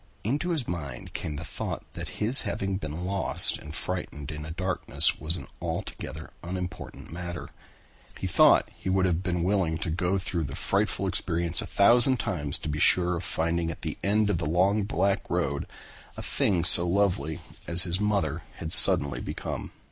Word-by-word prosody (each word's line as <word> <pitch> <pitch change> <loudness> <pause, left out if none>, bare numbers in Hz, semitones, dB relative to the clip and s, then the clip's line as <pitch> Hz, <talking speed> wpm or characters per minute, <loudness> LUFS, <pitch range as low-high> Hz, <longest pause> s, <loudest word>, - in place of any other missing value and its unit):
Into 145 - -1
his 155 -8 -1
mind 70 -8 -6
came 75 - -5
the 80 +3 -6
thought - - -5
that - - -6
his 115 +6 +5
having 100 -3 -2
been 80 0 -5
lost 95 0 +1
and 75 +1 -9
frightened 80 -5 -5
in 75 0 -6
the 75 - -7
darkness 90 +2 0
was 80 +3 0
an - - -8 0.2
altogether 80 0 -5
unimportant 90 -3 -7
matter. 85 +1 -6 0.7
He - - -5
thought - - +5
that - - -24
he - - -5
would 95 0 +2
have 90 -1 0
been 90 -3 -2
willing 90 -4 +1
to 80 0 -3
go 90 +3 0
through 90 -3 -3
the 70 - -6
frightful 100 -1 0
experience 85 -2 +2
a - - -5
thousand 120 +5 +5
times 80 -10 0
to - - -8
be 75 0 -3
sure 90 +3 +4
of 85 - -6
finding 85 +1 -1
at 80 - -8
the - - -4
end 105 +2 +2
of 85 - -1
the 75 - -2
long 95 +5 +2
black 100 0 0
road - - -1 0.5
a - - -6
thing 90 -4 0
so 85 0 +7
lovely 85 -5 0 0.3
as 85 +1 +7
his 90 +1 -2
mother 100 -7 0
had 80 -1 -6
suddenly 70 -4 +6
become. - - -5
90 Hz, 185 wpm, -27 LUFS, 80-100 Hz, 0.7 s, so